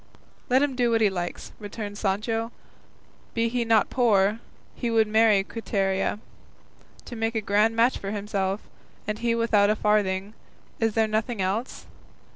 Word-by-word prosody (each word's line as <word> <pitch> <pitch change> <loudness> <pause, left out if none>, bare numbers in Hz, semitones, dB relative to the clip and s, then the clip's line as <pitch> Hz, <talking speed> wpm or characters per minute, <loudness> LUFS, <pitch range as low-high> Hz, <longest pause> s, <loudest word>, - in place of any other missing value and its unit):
"Let 260 +3 +4
him 280 -3 -1
do 245 -1 +2
what 225 -1 +2
he 210 -2 +4
likes," 175 -2 -5
returned 205 0 -6
Sancho; 225 +3 -1 0.8
"be 230 0 +1
he 245 0 0
not 225 -2 +2
poor, 215 -4 +3 0.3
he 240 - -3
would 225 -1 +3
marry 215 -2 +4
Quiteria. 195 -3 -1 0.9
To 240 - -8
make 225 0 -2
a - - +2
grand 210 +2 +2
match 235 +3 +3
for 195 - -5
himself, 200 -1 -2 0.5
and 210 0 -2
he 235 0 +1
without 215 -3 +3
a 215 - +3
farthing; 205 -1 0 0.5
is 225 -2 0
there 220 -1 +3
nothing 220 +1 -2
else? 195 +7 -2
220 Hz, 155 wpm, -25 LUFS, 200-230 Hz, 0.9 s, Let